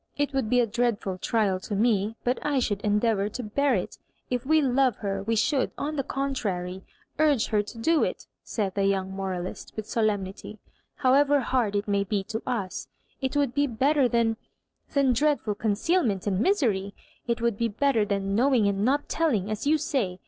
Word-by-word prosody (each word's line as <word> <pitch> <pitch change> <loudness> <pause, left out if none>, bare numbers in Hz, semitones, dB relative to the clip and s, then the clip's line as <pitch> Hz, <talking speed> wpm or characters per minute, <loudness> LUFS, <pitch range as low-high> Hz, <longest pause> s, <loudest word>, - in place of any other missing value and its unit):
It 290 0 0
^voold 265 -5 -1
be 250 - +4
a 240 - +4
dreadful 215 -5 -1
trial 200 -3 +1
to 205 +2 -5
me, 215 0 +1
but 245 +1 -1
I 295 -2 0
should 205 -5 0
endeavour 210 -1 +1
to 250 +4 -6
bear 270 +5 +1
it 185 - -4 0.3
If 250 +1 -2
we 315 +1 +5
love 260 -4 +2
her, 195 -2 -3
we 225 +3 -1
should, 260 +5 +1
on 305 +2 -3
the 280 - 0
contrary, 195 -10 -3 0.4
urge 295 -7 +3
her 210 -1 +2
to 210 +3 -10
do 320 +8 +2
it," - - -3 0.2
said 200 -4 -3
the 195 0 0
young 190 -1 0
moralist, 190 -2 -5
with 220 -1 -5
solemnity, 210 -2 -2 0.4
"however 280 +1 +4
hard 235 -5 0
it 205 +1 -1
maybe 200 0 0
to 220 0 -3
us 210 -8 -3 0.3
It 265 +2 -1
would 280 -4 +1
be 285 0 +2
better 270 +3 +2
than 230 -2 +1 0.3
— - - -42
than 275 -3 +4
dreadful 285 -4 +1
concealment 220 - 0
and 195 -2 0
misery, 215 - +1 0.2
— - - -34
it 235 -1 0
would 235 -2 +1
be 235 - +2
better 230 +1 +1
than 200 -1 -1
knowing 240 -1 +3
and 200 0 0
not 280 +5 +1
telling, 225 - 0
as 215 +6 -3
you 310 +2 +4
say. 225 - -2
225 Hz, 190 wpm, -26 LUFS, 200-270 Hz, 0.4 s, we